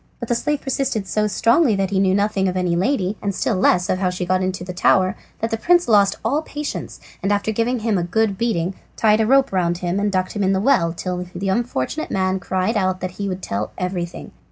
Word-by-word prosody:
But 235 - -6
the - - +3
slave 295 +4 -1
persisted 270 -6 -1
so 210 +2 0
strongly 230 - +3
that 195 -1 -1
he 195 - +1
knew 190 -1 +3
nothing 200 -1 +1
of 185 0 -1
any 180 -2 +1
lady, 200 0 0
and 200 -2 -2
still 230 - 0
less 180 -1 +3
of 185 - 0
how 185 -1 +1
she 180 0 -3
got 185 +1 +1
into 185 -1 -2
the 180 0 -6
tower, 185 +1 +3 0.3
that 225 - -1
the 225 - 0
prince 350 +8 +3
lost 205 -3 +4
all 280 +7 +1
patience, 295 -1 -6 0.2
and 195 - 0
after 205 +1 +1
giving 230 +2 0
him 215 -4 +1
a - - -1
good 205 +3 +1
beating 190 -5 -1 0.2
tied 215 0 +4
a 220 - +1
rope 270 +2 +4
round 175 -2 +1
him 180 +2 -2
and 205 0 0
ducked 185 -1 0
him 205 - -1
in 190 0 +2
the 190 - +1
well 190 -7 +3
till 180 +1 -4
the 195 +2 -2
unfortunate 235 - -2
man 190 0 0
cried 185 +4 -1
out 185 -2 0
that 185 0 -4
he 200 - -1
would 185 0 -5
tell 100 +2 -3
everything. 180 -2 -4
195 Hz, 240 wpm, -21 LUFS, 185-225 Hz, 0.3 s, lost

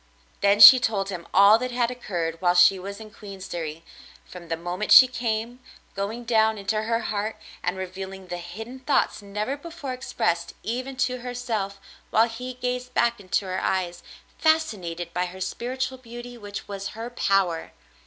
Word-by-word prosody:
Then 200 +1 +3
she 215 +5 +12
told 200 -5 -1
him 175 -3 -6
all 200 +3 +7
that 255 +1 -3
had 240 -1 0
occurred 170 -9 -4
while 175 -1 +3
she 180 +2 +6
was 200 +2 -7
in 215 -1 -11
Queensderry, 175 -6 -7 0.4
from 175 -2 -11
the 165 0 -2
moment 175 +5 -4
she 260 - +11
came, 235 0 -3 0.3
going 205 +5 -4
down 220 -2 +2
into 210 +2 -1
her 230 +1 -1
heart 215 0 -2 0.3
and 180 +1 -2
revealing 190 +1 -7
the 175 -1 -5
hidden 220 +9 -8
thoughts 265 -4 0
never 210 +6 -3
before 295 -3 -7
expressed 175 -9 -2
even 255 +4 -4
to 250 0 -4
herself, 235 -5 -4 0.3
while 225 +1 +4
he 250 +2 -7
gazed 250 0 -4
back 235 -1 +2
into 195 0 -1
her 185 0 -3
eyes 175 -2 -1 0.4
fascinated 185 - 0
by 180 +1 0
her 185 +1 -10
spiritual 255 +6 -3
beauty 240 0 -9
which 205 -3 -8
was 195 -1 -5
her 230 +2 -6
power. 195 -7 +1
210 Hz, 165 wpm, -25 LUFS, 185-245 Hz, 0.4 s, she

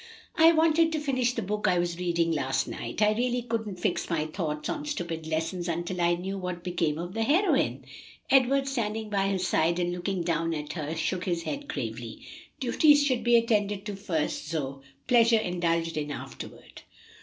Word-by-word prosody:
"I 325 +1 +7
wanted 325 0 +4
to 310 - 0
finish 255 -4 0
the 230 - -3
book 210 +2 -1
I 180 -1 +3
was 175 0 -1
reading 170 -2 +1
last 135 -4 0
night. 120 - -3
I 210 - +5
really 245 +2 0
couldn't 220 -5 -3
fix 180 0 -1
my 160 -3 0
thoughts 155 -2 -3
on 300 -3 -3
stupid 170 - -4
lessons 165 +3 -2
until 175 +2 -2
I 170 0 +3
knew 190 +3 -4
what 180 -2 -5
became 170 -4 -1
of 175 +2 -5
the 225 - -2
heroine." 320 - +2 0.5
Edward, 270 +1 +4
standing 220 -4 -2
by 195 -1 +1
her 195 - 0
side 170 -2 +1
and 175 0 0
looking 180 +1 -2
down 165 -1 0
at 150 -1 -5
her, 155 -1 -4
shook 175 +3 -2
his 170 -2 -1
head 285 - -4
gravely. 300 - -5 0.4
"Duties 290 +3 +5
should 255 -4 +1
be 240 0 +4
attended 210 -4 +2
to 205 -2 -4
first, 165 -7 -2
Zoe, 140 -4 -3 0.2
pleasures 230 -2 +5
indulged 170 -2 0
in 150 -1 -2
afterward." 145 - -9
185 Hz, 185 wpm, -28 LUFS, 165-235 Hz, 0.5 s, I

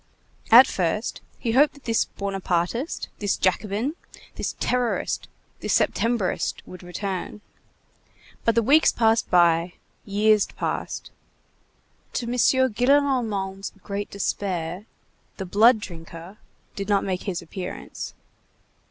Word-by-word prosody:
At 245 +4 +10
first, 190 +1 -2 0.2
he 230 - -2
hoped 285 +6 +4
that 285 - -17
this 230 -1 +1
Buonapartist, 195 - -2
this 205 -2 0
Jacobin, 210 - 0 0.4
this - - -4
terrorist, 250 -2 -1 0.3
this - - +2
Septembrist, 230 -5 0
would 185 - -11
return. 190 +3 -5 1.0
But 230 - +2
the 230 - +3
weeks 295 +7 +5
passed 225 0 +2
by, 170 0 +4 0.3
years 210 +1 +3
passed; - - -4 1.0
to 240 - -2
M. 235 - -3
Gillenormand's 245 -6 +2
great 200 0 -4
despair, 185 -1 -3 0.5
the 190 - -4
"blood 220 +6 +5
drinker" 170 +1 -10 0.4
did 200 0 -5
not 200 -1 +3
make 185 -2 -2
his 180 -4 -3
appearance. 180 +2 -7
205 Hz, 110 wpm, -24 LUFS, 185-235 Hz, 1.0 s, At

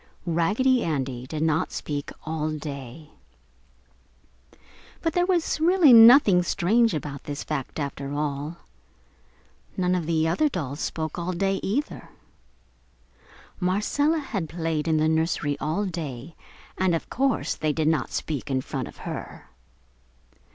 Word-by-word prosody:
Raggedy 210 +10 +2
Andy 130 -5 -3
did 155 +2 -3
not 160 0 +1
speak 145 -1 -4
all 155 -1 -2
day. 145 -1 -7 1.9
But 330 -2 0
there 355 +1 +2
was 350 -4 +1
really 335 -4 +6
nothing 225 -5 +8
strange 205 +5 +2
about 140 -2 -6
this 145 0 -5
fact, 150 -1 -4
after 140 -1 -4
all. 145 +2 -3 1.2
None 180 -1 +1
of 175 -4 -1
the 160 -1 +1
other 300 - +2
dolls 145 - -4
spoke 160 +1 -3
all 175 +2 -2
day, 195 +2 0
either. 275 +10 -3 1.5
Marcella 210 - +1
had 200 - -4
played 165 -2 -2
in 160 -1 +2
the 155 0 +2
nursery 160 -2 0
all 160 +8 -1
day 160 -5 -6 0.4
and 185 -2 +2
of 165 - -4
course 270 -1 0
they 155 - -1
did 155 0 -1
not 160 -2 +1
speak 150 -2 -4
in 130 -1 0
front - - -4
of - - -13
her. - - -7
165 Hz, 135 wpm, -25 LUFS, 150-200 Hz, 1.9 s, nothing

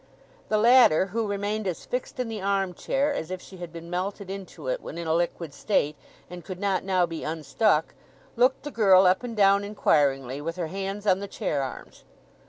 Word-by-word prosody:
The 215 - +2
latter, 230 -7 +6
who 225 -1 0
remained 205 +1 -2
as 180 - -4
fixed 250 0 -4
in 250 - -1
the 220 -3 -5
arm 195 -1 0
chair 280 - 0
as 160 - -4
if 185 0 -4
she 190 - -13
had 175 -2 -8
been 170 0 -9
melted 190 +2 -3
into 195 - -8
it - - -1
when - - -8
in 170 - -4
a 160 - +1
liquid 170 -2 -1
state, 150 -7 0 0.3
and 175 -1 -9
could 185 -2 -7
not 195 -2 0
now 185 -2 +2
be 165 -1 -6
unstuck, 160 +2 0 0.4
looked 250 +2 +2
the 295 - -6
girl 195 -5 +5
up 185 +1 +4
and 235 -3 -6
down 200 0 +5
inquiringly, 140 -9 +1
with 165 +2 -4
her 170 -3 -3
hands 195 +1 -4
on 190 -2 +3
the 200 - -5
chair 145 -6 -2
arms. 135 -1 -8
190 Hz, 205 wpm, -26 LUFS, 170-210 Hz, 0.4 s, latter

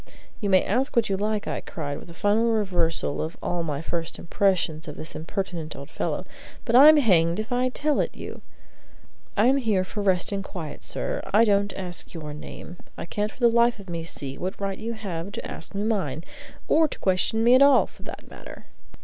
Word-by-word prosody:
"You 205 - -2
may 185 -1 +5
ask 260 +7 0
what 235 -3 +3
you 195 - +1
like," 210 +1 -1
I - - -2
cried, 145 -3 -5
with - - -13
a 170 - -11
final 210 +5 +2
reversal 175 -8 0
of 160 +2 -5
all 175 -1 -2
my 150 -2 -3
first 165 -1 -2
impressions 175 -4 0
of 150 - -6
this 155 - -7
impertinent 165 -2 -4
old 140 +3 -10
fellow; - - -2 0.4
"but 235 - +1
I'm 300 +4 +9
hanged 175 - +3
if 215 +3 -4
I 250 +1 +2
tell 295 +3 0
it - - -1
you! - - -8 1.0
I 210 - +5
am 265 +3 +5
here 215 -8 +1
for 205 +3 -5
rest 190 -2 +2
and 200 -1 -2
quiet, 170 -6 -7
sir. 60 - -2
I 215 +3 +6
don't 200 -1 +2
ask 180 -2 -5
you 165 - -6
your 150 -1 -6
name. 160 +3 -9 0.2
I - - -5
can't 210 +5 -2
for - - -19
the 240 - +6
life 235 0 +3
of 190 -3 -9
me 165 -1 -3
see 140 -4 -6
what 185 +2 -4
right 195 -1 -3
you 230 +1 -3
have 195 -4 -5
to - - -5
ask 165 - -7
me 200 - -1
mine, 180 -9 -1 0.4
or 315 +1 +4
to - - -8
question 190 +4 +1
me 240 +2 +6
at 255 - +6
all, 280 -2 +7
for - - -19
that - - -9
matter." - - -12
195 Hz, 215 wpm, -25 LUFS, 165-225 Hz, 1.0 s, I'm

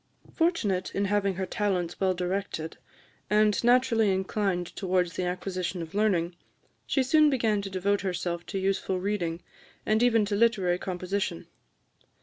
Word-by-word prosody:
Fortunate 240 - 0
in 200 - +1
having 200 -1 +1
her 190 +1 -2
talents 185 -4 -1
well 190 -1 +2
directed, 180 -3 -3 0.5
and 210 0 +3
naturally 240 -3 +4
inclined 190 -2 -1
towards 180 -3 0
the 185 - -2
acquisition 180 0 -3
of 160 - -10
learning, 185 -5 +1 0.5
she 270 - +2
soon 305 +3 +5
began 225 -6 +1
to 200 - -5
devote 195 +2 0
herself 175 -2 -2
to 195 - -4
useful 190 -1 0
reading, 180 -4 -2 0.4
and 215 +1 +2
even 230 -3 +4
to 205 0 -1
literary 200 -5 +2
composition. 185 - -3
195 Hz, 140 wpm, -28 LUFS, 180-210 Hz, 0.5 s, soon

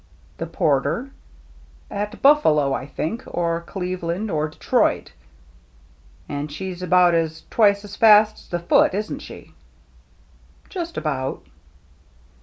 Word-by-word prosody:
"The 165 - -3
Porter? 165 - 0 0.8
At 205 +1 -5
Buffalo, 155 - +4
I 135 - -4
think, 185 - -4
— - - -15
or 170 -1 -1
Cleveland, 180 +2 -4
or 155 -1 0
Detroit." 155 - 0 0.6
" - - -30
And 145 +1 -4
she's 180 +3 -6
about 180 -1 +4 0.4
twice 200 -2 +3
as 200 0 -9
fast 215 -1 +6
as - - -18
the 175 - -2
Foote^ 175 +2 +3
isn't 210 +1 -3
she? - - -12 0.6
" - - -31
"Just 340 -3 -5
about." 135 -4 -3
175 Hz, 125 wpm, -22 LUFS, 150-210 Hz, 0.8 s, fast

